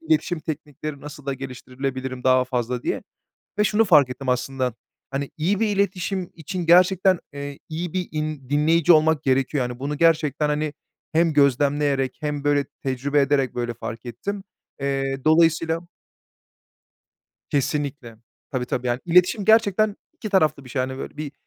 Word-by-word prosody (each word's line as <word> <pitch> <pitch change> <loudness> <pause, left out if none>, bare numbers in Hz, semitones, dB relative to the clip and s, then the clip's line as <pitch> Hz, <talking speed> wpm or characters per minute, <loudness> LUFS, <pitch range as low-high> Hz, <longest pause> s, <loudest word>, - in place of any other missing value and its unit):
iletişim 310 - 0
teknikleri 150 -1 -6
nasıl 145 -1 -10
da 140 - -1
geliştirilebilirim 130 0 -5
daha 130 0 +4
fazla, 125 -1 -2
diye. - - -2 0.6
Ve - - +5
şunu 210 +2 +3
fark 150 -9 +6
ettim 130 +1 -5
aslında. 125 0 -1 0.4
Hani 140 0 -3
iyi 185 +6 +1
bir 225 - +2
iletişim 190 -1 -1
için 175 +2 -5
gerçekten, 185 +2 +5
eee, 140 0 -6
iyi 160 +1 -4
bir 185 -1 -1
in 155 -4 -4
dinleyici 160 +3 +4
olmak 155 -1 +3
gerekiyor. 135 +1 +1
Yani 125 - -8
bunu 145 +2 -3
gerçekten 155 -2 +2
hani 150 0 -1 0.4
hem 165 0 +3
gözlemleyerek 140 -1 +2
hem 150 -1 -3
böyle 145 -1 +2 0.2
tecrübe 140 +2 +1
ederek 135 -2 +1
böyle 120 -1 -2
fark 115 +1 -7
ettim. 195 - -5 0.4
Eee, 135 -1 -1
dolayısıyla 165 +1 +3 1.6
Kesinlikle. 140 -4 -2 0.3
Tabii, 125 -3 -2
tabii, 125 0 -2
yani 120 +1 0
iletişim 180 +4 +3
gerçekten 215 -1 +4 0.2
2 215 - -7
taraflı 155 -8 +2
bir - - -12
şey, 130 - -1
hani, 130 +1 -3
böyle - - -7
bir, 150 -2 -5
145 Hz, 150 wpm, -23 LUFS, 135-165 Hz, 1.6 s, fark